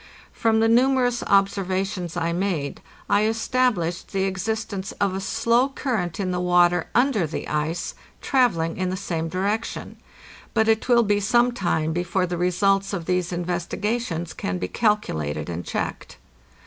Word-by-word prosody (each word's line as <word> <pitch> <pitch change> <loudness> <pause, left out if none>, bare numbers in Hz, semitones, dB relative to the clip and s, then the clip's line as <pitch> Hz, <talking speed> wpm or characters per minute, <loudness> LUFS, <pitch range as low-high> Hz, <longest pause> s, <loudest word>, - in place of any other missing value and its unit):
From 220 -1 +2
the 225 - +4
numerous 245 +1 +3
observations 195 -2 0
I 170 0 0
made 175 -6 -2 0.3
I 205 +1 +3
established 225 -6 0
the 190 0 +1
ex 190 0 -3
istence 215 -3 -3
of 200 -2 +1
a 190 - -3
slow 230 +5 +2
current 215 - -2
in 185 -2 -1
the 180 - -1
water 175 -1 +3
under 240 - +3
the 155 - -5
ice, 155 +3 -2 0.3
travel 245 - +2
ling 165 0 -2
in 185 0 -1
the 185 - -2
same 165 -4 -3
direction. 200 +6 -2 0.6
But 220 -1 +3
it 225 +2 +1
will 240 -1 +6
be 205 -1 +2
some 240 +4 +3
time 160 -7 -1
before 180 +2 0
the 175 -1 -4
results 195 +3 +2
of 175 -4 -3
these 180 0 0
investigations 175 +1 -2
can 90 - -3
be 90 - -3
calculated 80 - -1
and 85 +1 -4
checked. - - -4
190 Hz, 160 wpm, -24 LUFS, 175-220 Hz, 0.6 s, will